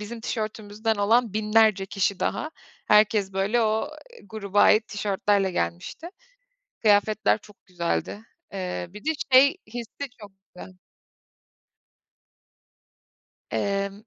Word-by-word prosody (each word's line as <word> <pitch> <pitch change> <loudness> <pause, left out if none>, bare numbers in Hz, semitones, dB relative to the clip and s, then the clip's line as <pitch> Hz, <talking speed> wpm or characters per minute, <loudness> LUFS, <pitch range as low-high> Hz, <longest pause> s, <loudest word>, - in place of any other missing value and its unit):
bizim 225 +2 -7
tişörtümüzden 215 -1 -3
olan 225 +2 +2
binlerce 215 -2 +3
kişi 195 -1 -1
daha 310 - -2 0.4
herkes, 210 -2 +3
böyle, 200 +5 +1
o, 220 +7 0 0.2
eee, - - -15
gruba 205 -1 -1
ait 215 +1 +4
tişörtlerle 200 -1 0
gelmişti, 85 - -4 0.7
kıyafetler 215 0 +3
çok 210 -1 -20
güzeldi, 180 +3 -3 0.3
eee, 180 -2 -4
bir 205 +4 -11
de, 315 - +1 0.2
şey, 270 +2 +7
hissi 240 +4 -7
çok 205 -2 -11 0.2
güzel. 185 0 -11 2.7
Emm 200 +1 -2
210 Hz, 105 wpm, -25 LUFS, 195-220 Hz, 2.7 s, şey